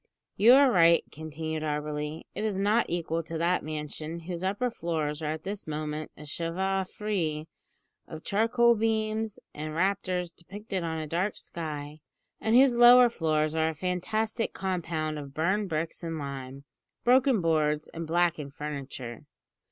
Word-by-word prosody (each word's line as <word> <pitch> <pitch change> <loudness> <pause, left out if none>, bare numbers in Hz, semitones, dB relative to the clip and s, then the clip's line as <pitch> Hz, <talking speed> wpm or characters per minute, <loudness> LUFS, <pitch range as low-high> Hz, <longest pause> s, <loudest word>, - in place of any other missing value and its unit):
"You 230 +4 +7
are 275 -1 +6
right," 170 -3 +5
continued 160 0 -5
Auberly; 150 0 -3
"it 210 - -4
is 210 -3 -1
not 210 +4 +2
equal 165 -1 -1
to 165 0 -6
that 175 +2 +1
mansion, 155 +2 -5
whose 175 +1 -5
upper 205 +6 0
floors 160 -6 -2
are 155 -1 -1
at 160 0 -8
this 200 -2 -5
moment 155 0 -4
a 150 - -10
chevaux 185 +5 -1
de - - -24
frise 165 -8 -2 0.6
of 160 0 -9
charcoal 235 +3 +3
beams 220 -1 -1 0.2
and 155 +1 -5
rafters 180 -1 0
depicted 195 +2 -6
on 160 -1 -2
a 155 - -3
dark 175 +6 -1
sky, 150 -2 -6 0.4
and 220 +1 +1
whose 260 0 +7
lower 240 +1 +8
floors 155 -6 0
are 160 0 +2
a 160 - -5
fantastic 215 +7 -1
compound 165 -5 -2
of 140 -1 -9
burned 190 +5 +1
bricks 160 0 -3
and 165 -2 -4
lime, 135 -1 -6 0.4
broken 255 -1 +4
boards, 155 -3 +1
and 165 0 -5
blackened 165 -4 0
furniture." 140 -4 -6
165 Hz, 155 wpm, -28 LUFS, 155-200 Hz, 0.6 s, lower